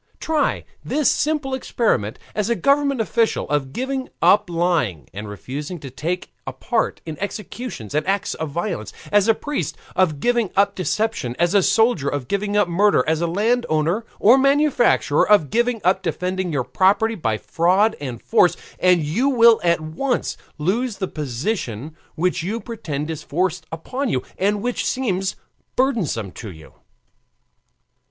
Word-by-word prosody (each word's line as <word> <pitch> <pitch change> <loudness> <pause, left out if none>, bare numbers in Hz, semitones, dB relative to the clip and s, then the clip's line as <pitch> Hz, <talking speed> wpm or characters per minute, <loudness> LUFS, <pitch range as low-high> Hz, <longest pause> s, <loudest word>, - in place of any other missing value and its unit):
Try 315 -2 0 0.2
the 300 -1 -1
simple 295 -2 +1
experiment, 225 - 0 0.2
as 210 +1 -1
a 235 - +2
government 280 -1 +2
official, 225 +1 +1
of 140 -3 0
giving 260 - -3
up 205 -2 +4
lying, 165 - 0
and 105 +1 -6
refusing 145 - -6
to 135 -3 -9
take 175 +7 -4
a - - -2
part - - -1
in 160 -2 -7
executions 205 - -6
and 150 +4 0
acts 195 0 0
of 160 - -4
violence; 170 +8 -3 0.2
as 205 0 +4
a 225 - +5
priest, 290 +4 -3 0.2
of 160 -6 +2
giving 240 +1 +1
up 200 0 +3
deception; 185 - -1
as 175 +2 +2
a 200 - +5
soldier, 220 - +2
of 140 -4 -3
giving 205 +1 -1
up 205 - +3
murder; 190 -3 +3
as 160 +2 0
landowner 180 -1 +1 0.2
or 240 +6 +6
manufacturer, 275 - +3
of 205 -9 +4
giving 235 +1 +1
up 190 +1 +3
defending 180 +2 -2
your 140 -4 0
property 200 - +2
by 115 - -1
fraud 185 - +2
and 125 -5 -6
force; 180 -7 +3 0.2
and 180 -3 +4
you 210 - +1
will 235 -3 +6
at 170 -2 +2
once 200 +12 -2 0.2
lose 205 +9 -1
the 190 - -2
position 145 - -4 0.2
which 180 +2 0
you 205 +7 -3
pretend 160 -10 -5
is 160 - -5
forced 175 0 -2
upon 250 - -3
you, 130 - 0 0.2
and 205 +2 +1
which 245 0 -1
seems 195 -7 -1 0.4
burdensome 190 - 0
to 110 +3 -8
you. 80 -4 -13
185 Hz, 155 wpm, -21 LUFS, 155-230 Hz, 0.4 s, or